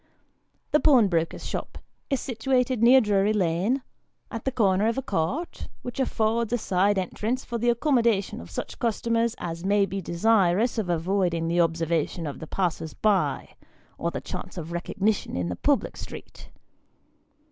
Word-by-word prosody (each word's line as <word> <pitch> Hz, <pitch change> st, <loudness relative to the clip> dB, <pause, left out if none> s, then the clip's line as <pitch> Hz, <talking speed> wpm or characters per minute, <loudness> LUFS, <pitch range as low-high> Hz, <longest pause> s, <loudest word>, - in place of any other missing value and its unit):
The 300 Hz, -, +4 dB
pawnbroker's 200 Hz, -, +3 dB
shop -, -, -5 dB, 0.3 s
is 275 Hz, -3 st, +1 dB
situated 250 Hz, -1 st, 0 dB
near 255 Hz, +3 st, +7 dB
Drury 205 Hz, -1 st, +2 dB
Lane, 200 Hz, +7 st, +1 dB, 0.5 s
at 230 Hz, -2 st, -6 dB
the 265 Hz, -, +1 dB
corner 205 Hz, -4 st, +2 dB
of 230 Hz, -, 0 dB
a 270 Hz, -, -1 dB
court, 230 Hz, -, -2 dB, 0.2 s
which 245 Hz, +2 st, -6 dB
affords 230 Hz, -3 st, 0 dB
a 245 Hz, -, +2 dB
side 200 Hz, -1 st, +1 dB
entrance 220 Hz, +7 st, -2 dB
for 235 Hz, -1 st, -3 dB
the 240 Hz, +2 st, +2 dB
accommodation 235 Hz, -, +1 dB
of 85 Hz, -, -11 dB
such 95 Hz, -, -6 dB
customers 230 Hz, 0 st, 0 dB
as 170 Hz, 0 st, -5 dB
may 200 Hz, +1 st, +3 dB
be 195 Hz, +1 st, -4 dB
desirous 200 Hz, +4 st, +2 dB
of 195 Hz, -5 st, -2 dB
avoiding 175 Hz, -1 st, 0 dB
the 170 Hz, +1 st, +2 dB
observation 165 Hz, 0 st, 0 dB
of 145 Hz, -, -5 dB
the 160 Hz, -, -8 dB
passers 165 Hz, -4 st, -2 dB
by, 210 Hz, -3 st, +1 dB, 0.5 s
or -, -, 0 dB
the -, -, -5 dB
chance -, -, -7 dB
of 165 Hz, -1 st, -6 dB
recognition 190 Hz, +4 st, -1 dB
in 90 Hz, -1 st, -1 dB
the 90 Hz, -, -3 dB
public 285 Hz, -, +1 dB
street. -, -, -10 dB
205 Hz, 160 wpm, -26 LUFS, 175-235 Hz, 0.5 s, near